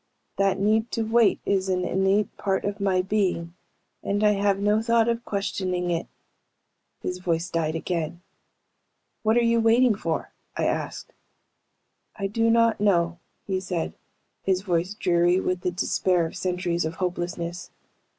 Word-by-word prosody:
That 195 -1 +2
need 220 +3 +2
to 230 - 0
wait 225 0 +3
is 190 -1 +1
an 180 -1 0
innate 195 +2 +1
part 195 -1 -1
of 205 +1 -3
my 190 -2 +2
being 185 -4 -1 0.5
and 205 +1 -1
I 210 - +6
have 200 -1 +2
no 210 +2 +2
thought 230 0 +3
of 235 0 0
questioning 185 -3 -2
it." 170 0 -2 1.0
His 180 0 -3
voice 175 -1 -1
died 160 -1 0
again. 170 +1 -3 1.0
"What 220 +1 +2
are 240 - +4
you 230 0 +3
waiting 230 +1 +4
for?" 165 -5 -3 0.3
I - - 0
asked. - - -3 1.0
"I 200 - -4
do 225 +3 +1
not 230 -2 +3
know," 170 -4 +2 0.3
he 190 -1 -1
said, 180 -3 -3 0.5
his 185 -1 +1
voice 180 +1 -1
dreary 175 -1 +3
with 185 -1 -1
the 180 - 0
despair 180 -1 +1
of 160 - -7
centuries 180 -1 -1
of 160 +1 -3
hopelessness. 175 -1 -3
190 Hz, 150 wpm, -25 LUFS, 175-210 Hz, 1.0 s, I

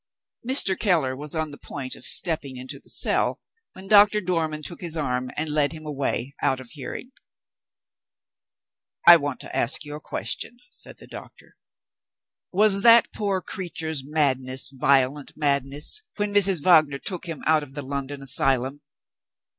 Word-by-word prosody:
Mr. 240 -6 +4
Keller 160 - +1
was 150 +3 -8
on 160 -1 -2
the 145 - -12
point 130 -3 -6
of - - -8
stepping 150 -7 -2
into 130 +1 -7
the - - -13
cell, - - +1 0.3
when 190 +1 -12
Doctor 210 +1 +6
Dormann 165 -5 -2
took 170 - -7
his 170 -2 -5
arm, 125 -4 -2
and 155 +1 -1
led 150 0 +2
him 155 -1 -10
away 140 -2 -2
out 130 - +1
of 130 -2 -12
hearing. 160 - -7 2.0
"I 170 0 +11
want 145 -3 -4
to - - -9
ask 120 - +1
you 145 - -6
a - - -7
question," 240 - -3
said - - -12
the - - -13
doctor. - - -13 1.0
"Was 200 +1 +4
that 230 +1 +6
poor 200 -3 -2
creature's 160 -5 -4
madness 130 -3 0
violent 135 +1 +1
madness, 145 - 0
when 205 -1 -2
Mrs. 195 -6 +4
Wagner 155 -6 +4
took 180 +4 -2
him 165 -2 -7
out 155 0 +3
of 140 -2 -11
the 145 - -5
London 140 +1 -5
asylum?" 135 +1 0
150 Hz, 155 wpm, -24 LUFS, 135-180 Hz, 2.0 s, I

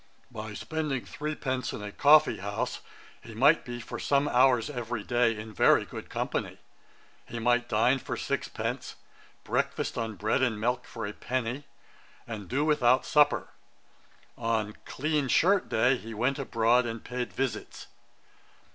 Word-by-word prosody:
By 110 -2 -7
spending 150 -7 -3
three 150 +9 -4
pence 130 -3 -2
in 105 - -6
a 105 - -6
coffee 150 +6 +5
house, 105 +5 -3 0.4
he 115 - -11
might 140 +8 +5
be 120 0 -6
for 115 - -7
some 140 +1 +2
hours 125 -3 +4
every 120 -5 -4
day 120 -1 +2
in 110 0 -8
very - - +4
good - - -9
company; - - -3 0.7
he 120 - -6
might 120 +1 +1
dine 120 +4 +3
for - - -5
six - - -2
pence, - - -4 0.5
breakfast - - -1
on 110 -2 -3
bread 105 +5 0
and 120 -5 +1
milk 125 +3 -1
for 115 -2 -6
a 100 - -5
penny, 130 +4 -3 0.6
and 105 -5 -7
do 140 +4 +1
without 130 -4 +3
supper. 150 -1 +3 0.9
On 110 -2 -1
clean 150 0 -1
shirt 190 +8 +3
day 125 +4 +3
he 115 -1 -9
went 130 +6 0
abroad, 120 -1 +2
and 115 -1 -5
paid 125 -1 -4
visits.' 135 -2 -4
120 Hz, 155 wpm, -28 LUFS, 115-135 Hz, 0.9 s, coffee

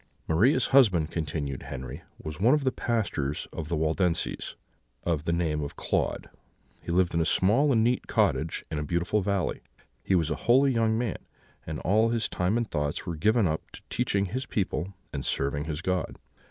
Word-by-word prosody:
"Maria's 115 - +3
husband," 95 - +5
continued 75 -4 -3
Henry, 65 +5 -7 0.2
"was 75 +1 -7
one 120 +9 +5
of 150 - -1
the 130 - +2
pastors 100 - -1
of 80 - -5
the 85 - 0
Waldenses, 80 +2 0 0.5
of 80 -3 -1
the 85 - +1
name 80 -3 0
of 70 - -5
Claude: - - -1 0.5
he - - -5
lived 90 0 +2
in 85 - +2
a - - +3
small 115 - +3
and 110 -3 +4
neat 120 +2 +1
cottage 80 - +1
in 80 - -1
a - - -2
beautiful 85 +7 0
valley; 100 -3 -1 0.4
he 95 - +2
was 80 -3 +1
a - - +1
holy 135 +3 +5
young 110 -1 +2
man, 115 -4 -1 0.5
and 80 -1 -3
all 110 +5 +3
his 115 -1 0
time 90 +5 0
and 120 -3 -2
thoughts 75 -2 -2
were 85 - -3
given 110 +7 +3
up 80 -2 0
to - - -12
teaching 100 -5 +1
his 130 +8 -4
people 95 -2 -2 0.2
and 70 -2 -3
serving 70 +3 -1
his 80 +1 -4
God. 90 -2 -1
90 Hz, 190 wpm, -28 LUFS, 80-110 Hz, 0.5 s, husband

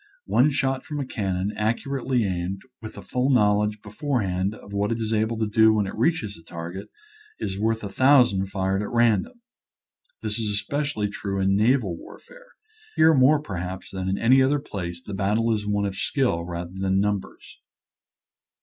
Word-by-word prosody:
One 130 +5 +4
shot 135 -2 0
from 150 -1 -5
a 140 - -2
cannon 95 -4 -2
ac 110 +2 0
curately 130 -4 -1
aimed, 95 +1 -3 0.2
with 110 - -8
a - - -8
full 125 +2 0
knowledge 105 -3 +2
before 125 +5 -2
hand 95 +2 -1
of 100 - -13
what 100 +1 0
it 115 - 0
is 110 -1 -2
able 110 +1 0
to 110 - 0
do 110 +1 +4
when 105 -2 +1
it 95 - -5
reaches 115 -3 0
the 85 - -14
target, 85 +4 -7 0.5
is 95 +1 -4
worth 110 +1 0
a 100 - -4
thousand 125 -5 +4
fired 95 0 -1
at 105 - -4
ran 115 -4 +3
dom. 245 -2 -14 0.8
This 110 0 -2
is 110 -2 -1
especially 125 +2 -1
true 100 -1 -4
in 95 0 +2
naval 110 -3 +2
warfare. - - -14 0.5
Here 160 +1 +6
more 145 +2 +4
perhaps 95 - -6
than 95 -1 -3
in 95 - 0
any 130 +3 +5
other 135 +3 +3
place 90 -11 -6
the 105 - -6
battle 105 +4 +1
is 105 -1 -3
one 105 0 0
of 100 - -2
skill 95 - 0
rather 85 0 -5
than 95 0 0
num 105 0 +1
bers. - - -15
105 Hz, 190 wpm, -24 LUFS, 95-125 Hz, 0.8 s, Here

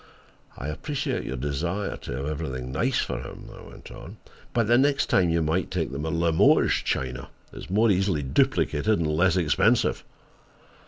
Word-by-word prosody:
"I 70 - -5
appreciate 145 - -3
your 65 0 -4
desire 85 +9 -2
to - - -8
have 65 +2 -4
everything 65 -5 -4
nice 65 - 0
for 65 - -2
him," - - -10
I - - -12
went - - -13
on, - - -11 0.3
"but 115 -2 +1
the 120 +3 +4
next 140 +2 +2
time, 90 -2 +3
you 85 0 +1
might 80 +3 0
take - - -2
the 70 - -5
Limoges 80 +1 +3
china 65 -1 -3 0.2
It's - - -9
more 105 +4 +3
easily 95 -5 +1
duplicated 75 +8 +1
and 85 - 0
less 85 +4 +2
expensive." 85 -5 +2
80 Hz, 165 wpm, -25 LUFS, 70-95 Hz, 0.3 s, the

